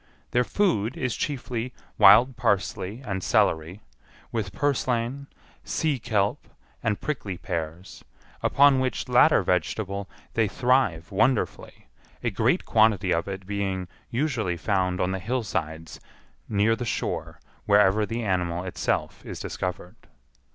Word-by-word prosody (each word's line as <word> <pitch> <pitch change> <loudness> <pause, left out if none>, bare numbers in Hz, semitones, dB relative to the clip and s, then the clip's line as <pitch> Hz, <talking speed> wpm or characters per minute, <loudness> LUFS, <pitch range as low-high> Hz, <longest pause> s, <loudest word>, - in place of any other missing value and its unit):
Their 125 - +3
food 130 - 0
is 125 -3 -1
chiefly 125 -3 -3 0.2
wild 110 +6 +7
parsley 105 0 -1
and 95 -3 -3
celery, 80 +4 +1 0.5
with 105 -4 -2
purslain, 130 +2 -1 0.4
sea 150 -5 -1
kelp, 105 -3 -1 0.3
and 105 -2 0
prickly 105 -11 -4
pears, 85 0 -5 0.4
upon 140 -1 +5
which 130 0 -2
latter 125 -4 +5
vegetable 95 +3 -1 0.2
they 110 -2 +2
thrive 120 -8 +1
wonderfully, 120 +4 0 0.4
a - - 0
great - - +1
quantity 105 -5 +3
of 85 +2 -1
it 95 -1 -6
being 95 -2 -2 0.2
usually 115 - -1
found 90 -1 0
on 90 - +1
the 95 - -2
hillsides 85 -9 -3 0.5
near 105 +2 +3
the 120 - -5
shore 115 - -3 0.3
wherever 105 0 +5
the 115 +2 -3
animal 90 -3 -1
itself 90 - -2
is - - -7
discovered. 90 -1 -5
105 Hz, 125 wpm, -26 LUFS, 95-125 Hz, 0.5 s, wild